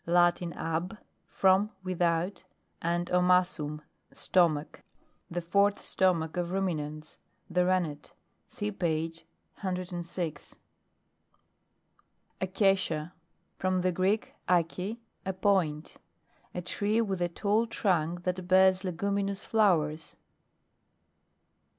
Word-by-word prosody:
Latin 175 Hz, 0 st, +3 dB
ab, 170 Hz, +6 st, -3 dB, 0.3 s
from, 190 Hz, +2 st, +3 dB
without, 175 Hz, 0 st, 0 dB, 0.4 s
and 170 Hz, +1 st, 0 dB
omassum, 180 Hz, -4 st, +2 dB, 0.3 s
stomach. 160 Hz, -5 st, +1 dB, 0.5 s
The 175 Hz, +1 st, -3 dB
fourth 200 Hz, +4 st, +3 dB
stomach 170 Hz, -3 st, +1 dB
of 175 Hz, -1 st, -1 dB
Ruminants. 155 Hz, -5 st, -3 dB, 0.3 s
The 180 Hz, +1 st, +3 dB
Ren 185 Hz, 0 st, +3 dB
net. 150 Hz, -2 st, -8 dB, 0.4 s
(See 210 Hz, 0 st, -4 dB
page 165 Hz, -3 st, -2 dB, 0.3 s
106.) 175 Hz, -4 st, -4 dB, 1.9 s
ACACIA. 185 Hz, -4 st, +1 dB, 0.5 s
From 185 Hz, -1 st, +1 dB
the 185 Hz, 0 st, +2 dB
Greek, 190 Hz, +5 st, 0 dB, 0.2 s
alee, 180 Hz, +5 st, +1 dB, 0.3 s
a 190 Hz, -, -2 dB
point. 185 Hz, -6 st, 0 dB, 0.6 s
A 180 Hz, -, -3 dB
tree 205 Hz, +5 st, 0 dB
with 195 Hz, -5 st, -1 dB
a 175 Hz, -, +1 dB
tall 210 Hz, +6 st, +1 dB
trunk 175 Hz, -6 st, 0 dB
that 180 Hz, 0 st, -2 dB
bears 185 Hz, 0 st, +5 dB
leguminous 200 Hz, +2 st, -1 dB
flowers. 160 Hz, -8 st, +1 dB
180 Hz, 95 wpm, -29 LUFS, 165-190 Hz, 1.9 s, bears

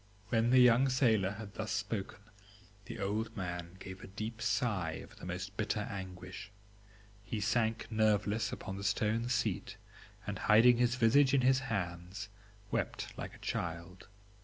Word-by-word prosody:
"When 115 Hz, 0 st, +2 dB
the 130 Hz, -, +5 dB
young 125 Hz, +2 st, +6 dB
sailor 110 Hz, -7 st, +3 dB
had 105 Hz, -1 st, -8 dB
thus 110 Hz, +1 st, -4 dB
spoken, 100 Hz, 0 st, -3 dB, 0.6 s
the -, -, -7 dB
old 110 Hz, +2 st, -2 dB
man 90 Hz, -2 st, -4 dB
gave 95 Hz, 0 st, -9 dB
a -, -, -8 dB
deep 110 Hz, +4 st, -6 dB
sigh 105 Hz, -6 st, 0 dB
of -, -, -10 dB
the -, -, -9 dB
most 90 Hz, +1 st, -5 dB
bitter 105 Hz, 0 st, 0 dB
anguish; 95 Hz, -2 st, -7 dB, 0.7 s
he 105 Hz, +2 st, -4 dB
sank 110 Hz, +2 st, +1 dB
nerveless 110 Hz, 0 st, +2 dB
upon 95 Hz, -, -5 dB
the 100 Hz, -, -6 dB
stone 110 Hz, +3 st, +1 dB
seat, 120 Hz, -6 st, -1 dB, 0.5 s
and -, -, -4 dB
hiding 115 Hz, +3 st, +7 dB
his 120 Hz, 0 st, +2 dB
visage 130 Hz, +3 st, +5 dB
in 135 Hz, -, +4 dB
his 130 Hz, +1 st, +4 dB
hands, 95 Hz, -5 st, -4 dB, 0.4 s
wept -, -, -2 dB
like -, -, -6 dB
a -, -, -13 dB
child. 85 Hz, +2 st, -4 dB
105 Hz, 155 wpm, -33 LUFS, 95-115 Hz, 0.7 s, hiding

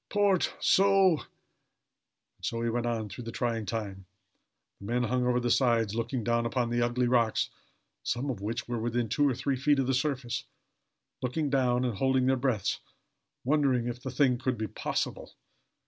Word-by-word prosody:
port 205 Hz, -3 st, +2 dB
so!" 195 Hz, -3 st, +4 dB
And -, -, -11 dB, 1.2 s
so 115 Hz, 0 st, -2 dB
he 115 Hz, -, 0 dB
went 120 Hz, +1 st, -1 dB
on 115 Hz, -2 st, -1 dB
through 115 Hz, +4 st, -8 dB
the 115 Hz, -, -5 dB
trying 115 Hz, -3 st, -2 dB
time. 100 Hz, -4 st, -4 dB, 0.7 s
The 100 Hz, -, -10 dB
men 120 Hz, +2 st, +1 dB
hung 125 Hz, +1 st, 0 dB
over 125 Hz, 0 st, +2 dB
the 120 Hz, -1 st, 0 dB
sides, 115 Hz, -5 st, +2 dB
looking 115 Hz, +1 st, -2 dB
down 115 Hz, +1 st, +1 dB
upon 120 Hz, -1 st, -1 dB
the 120 Hz, 0 st, +1 dB
ugly 120 Hz, +1 st, +1 dB
rocks, 120 Hz, -2 st, +2 dB, 0.5 s
some 135 Hz, +3 st, -2 dB
of 110 Hz, -6 st, -6 dB
which 115 Hz, +4 st, -3 dB
were 120 Hz, -1 st, -2 dB
within 120 Hz, 0 st, -1 dB
two 145 Hz, +4 st, +3 dB
or 130 Hz, -, -1 dB
three 135 Hz, +2 st, -1 dB
feet 145 Hz, +2 st, +3 dB
of 135 Hz, -, +1 dB
the 135 Hz, -, +1 dB
surface 130 Hz, -2 st, -1 dB, 0.8 s
looking 140 Hz, +3 st, -1 dB
down, 125 Hz, -2 st, +2 dB
and 120 Hz, -5 st, -2 dB
holding 130 Hz, -1 st, +2 dB
their 130 Hz, +1 st, +3 dB
breaths 125 Hz, -6 st, 0 dB, 0.6 s
wondering 135 Hz, -3 st, +2 dB
if 120 Hz, 0 st, -5 dB
the 130 Hz, -, -4 dB
thing 130 Hz, -1 st, +2 dB
could 130 Hz, -1 st, -1 dB
be 110 Hz, -, -2 dB
possible. -, -, -3 dB
125 Hz, 180 wpm, -29 LUFS, 115-130 Hz, 1.2 s, so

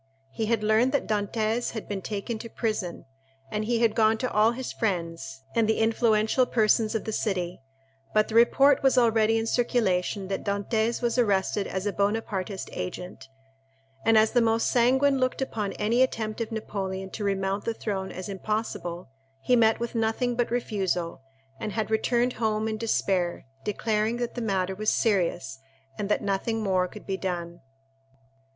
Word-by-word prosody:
He 220 Hz, +10 st, -2 dB
had 225 Hz, -2 st, +1 dB
learned 220 Hz, +4 st, +3 dB
that 285 Hz, -, +1 dB
Dantès 215 Hz, +2 st, -1 dB
had 220 Hz, -, -6 dB
been 200 Hz, -2 st, -3 dB
taken 215 Hz, +3 st, -4 dB
to 230 Hz, -, -7 dB
prison, 215 Hz, -7 st, -3 dB, 0.5 s
and 210 Hz, 0 st, -1 dB
he 235 Hz, 0 st, 0 dB
had 225 Hz, -2 st, +4 dB
gone 220 Hz, 0 st, +3 dB
to 255 Hz, +2 st, -2 dB
all 215 Hz, +1 st, +4 dB
his 255 Hz, +1 st, -5 dB
friends, 165 Hz, -, -3 dB
and 225 Hz, -2 st, +2 dB
the 220 Hz, -, +2 dB
influential 225 Hz, +2 st, +2 dB
persons 220 Hz, 0 st, +2 dB
of 220 Hz, -, -1 dB
the 220 Hz, -, -2 dB
city; 180 Hz, -, -2 dB, 0.5 s
but 215 Hz, 0 st, +3 dB
the -, -, -7 dB
report 270 Hz, +4 st, +5 dB
was 270 Hz, -1 st, +3 dB
already 225 Hz, -2 st, +4 dB
in 225 Hz, -, 0 dB
circulation 205 Hz, -5 st, 0 dB
that 195 Hz, -, -3 dB
Dantès 220 Hz, +4 st, -1 dB
was 240 Hz, +1 st, +1 dB
arrested 200 Hz, -2 st, +1 dB
as 190 Hz, +1 st, -3 dB
a 205 Hz, -, -1 dB
Bonapartist 200 Hz, -2 st, -1 dB
agent; 180 Hz, -5 st, -6 dB, 0.7 s
and 225 Hz, -1 st, +5 dB
as 215 Hz, 0 st, +5 dB
the 245 Hz, -, +3 dB
most 225 Hz, 0 st, +2 dB
sanguine 265 Hz, +3 st, +3 dB
looked 255 Hz, 0 st, 0 dB
upon 220 Hz, -6 st, -2 dB
any 230 Hz, +4 st, +1 dB
attempt 225 Hz, -3 st, 0 dB
of 230 Hz, -, -3 dB
Napoleon 190 Hz, -3 st, -4 dB
to 215 Hz, -, -5 dB
remount 195 Hz, 0 st, -1 dB
the 230 Hz, -, 0 dB
throne 195 Hz, -4 st, -3 dB
as 185 Hz, -, -6 dB
impossible, 195 Hz, -3 st, -3 dB, 0.4 s
he 250 Hz, -, +4 dB
met 225 Hz, -2 st, +4 dB
with 235 Hz, 0 st, -3 dB
nothing 230 Hz, +2 st, 0 dB
but 240 Hz, 0 st, 0 dB
refusal, 190 Hz, -, -2 dB, 0.4 s
and 215 Hz, -2 st, -4 dB
had 220 Hz, +1 st, -2 dB
returned 240 Hz, +2 st, +2 dB
home 215 Hz, 0 st, +1 dB
in 215 Hz, -1 st, -3 dB
despair, 190 Hz, -6 st, 0 dB, 0.2 s
declaring 215 Hz, +2 st, 0 dB
that 240 Hz, -1 st, -3 dB
the 245 Hz, -, -4 dB
matter 190 Hz, -4 st, 0 dB
was 215 Hz, +3 st, 0 dB
serious 170 Hz, -, 0 dB, 0.4 s
and 200 Hz, +5 st, -4 dB
that 210 Hz, -, +1 dB
nothing 215 Hz, +3 st, -1 dB
more 185 Hz, -2 st, +2 dB
could 210 Hz, +3 st, -12 dB
be 195 Hz, -1 st, -2 dB
done. 175 Hz, -2 st, -4 dB
215 Hz, 170 wpm, -27 LUFS, 195-230 Hz, 0.7 s, report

